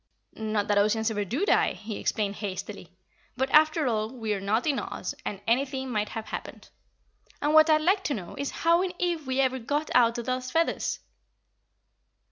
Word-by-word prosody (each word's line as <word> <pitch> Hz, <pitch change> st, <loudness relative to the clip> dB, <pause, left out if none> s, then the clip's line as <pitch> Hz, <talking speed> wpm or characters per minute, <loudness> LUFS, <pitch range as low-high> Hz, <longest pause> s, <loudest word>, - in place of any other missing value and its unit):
Not 215 Hz, -2 st, -2 dB
that 205 Hz, -1 st, +3 dB
Ozians 220 Hz, +2 st, +2 dB
ever 210 Hz, -1 st, -1 dB
do 255 Hz, -, -1 dB
die," -, -, +3 dB
he 215 Hz, -1 st, -7 dB
explained 205 Hz, -2 st, -1 dB
hastily, 200 Hz, -2 st, -6 dB, 0.5 s
"but, 265 Hz, +1 st, 0 dB
after 310 Hz, 0 st, +5 dB
all, 220 Hz, -3 st, 0 dB
we 225 Hz, -4 st, -3 dB
are 195 Hz, -, -3 dB
not 215 Hz, +4 st, 0 dB
in 290 Hz, -3 st, +1 dB
Oz -, -, -5 dB
and 200 Hz, -, -4 dB
anything 265 Hz, +2 st, 0 dB
might 210 Hz, -2 st, -1 dB
have 220 Hz, -1 st, -5 dB
happened. -, -, -8 dB, 0.7 s
And 295 Hz, +1 st, 0 dB
what 310 Hz, +1 st, +7 dB
I'd 310 Hz, 0 st, +5 dB
like 380 Hz, +5 st, +2 dB
to 290 Hz, -, 0 dB
know 180 Hz, -5 st, -7 dB
is 280 Hz, 0 st, -3 dB, 0.2 s
how 335 Hz, +1 st, +5 dB
in 370 Hz, -1 st, -2 dB
Ev 340 Hz, -5 st, -1 dB
we 260 Hz, 0 st, -1 dB
ever 260 Hz, -1 st, +1 dB
got 290 Hz, +6 st, -2 dB
out 235 Hz, -1 st, +4 dB
of 235 Hz, -, -4 dB
those 255 Hz, +1 st, -2 dB
feathers." 330 Hz, +5 st, 0 dB
250 Hz, 190 wpm, -27 LUFS, 215-300 Hz, 0.7 s, what